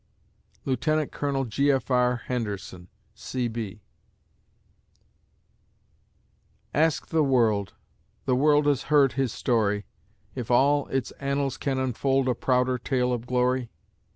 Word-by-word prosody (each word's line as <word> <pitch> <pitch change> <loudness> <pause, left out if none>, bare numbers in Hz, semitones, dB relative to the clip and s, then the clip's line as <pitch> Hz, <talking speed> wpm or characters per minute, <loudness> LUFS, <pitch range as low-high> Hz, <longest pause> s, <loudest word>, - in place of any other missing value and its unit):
LIEUT. 140 +3 0
COL. 140 -2 -1
G. 140 +5 +2
F. 135 -1 -1
R. 125 -1 +2
HENDERSON, 100 -7 -4 0.3
C.B.... 115 -5 -4 2.9
Ask 160 +1 +1
the 160 -1 +2
world 115 -7 +1 0.5
The 130 - +2
world 145 +2 +4
has 145 -3 +2
heard 145 -3 +5
his 130 -2 0
story 105 -5 0 0.5
If 125 -4 -6
all 140 +4 +3
its 135 -2 -2
annals 140 -1 -1
can 135 -2 -2
unfold 130 +1 0
A 125 - +3
prouder 125 +1 +1
tale 125 0 0
of 120 0 -4
glory? 125 -1 +1
130 Hz, 115 wpm, -26 LUFS, 120-140 Hz, 2.9 s, heard